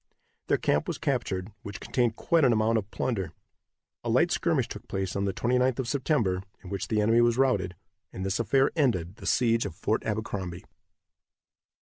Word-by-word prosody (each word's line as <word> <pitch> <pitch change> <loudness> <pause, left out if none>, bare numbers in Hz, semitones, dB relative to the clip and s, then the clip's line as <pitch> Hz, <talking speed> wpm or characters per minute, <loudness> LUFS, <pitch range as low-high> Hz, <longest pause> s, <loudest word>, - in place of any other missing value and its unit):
Their - - +3
camp - - +1
was - - -2
captured, 95 +2 -2
which 100 - -7
contained 120 -3 0
quite 165 +5 +2
an 130 - +6
amount 110 0 +3
of 100 -1 -8
plunder. 95 -11 -2 0.7
A - - -3
light - - +3
skirmish - - +1
took - - -9
place 95 -1 -3
on 100 0 0
the 100 - +1
29th 125 +1 +1
of 130 -3 -2
September, 125 - +1 0.2
in 95 - -9
which 100 -1 -3
the 110 - +1
enemy 115 +3 +4
was 120 0 +3
routed, 100 -9 +2 0.4
and 95 - -5
this 95 +2 -1
affair 135 +4 +3
ended 105 - +1
the - - -8
siege 115 -2 +3
of - - -5
Fort 110 - -1
Abercrombie. 100 -5 -4
110 Hz, 180 wpm, -28 LUFS, 95-125 Hz, 0.7 s, an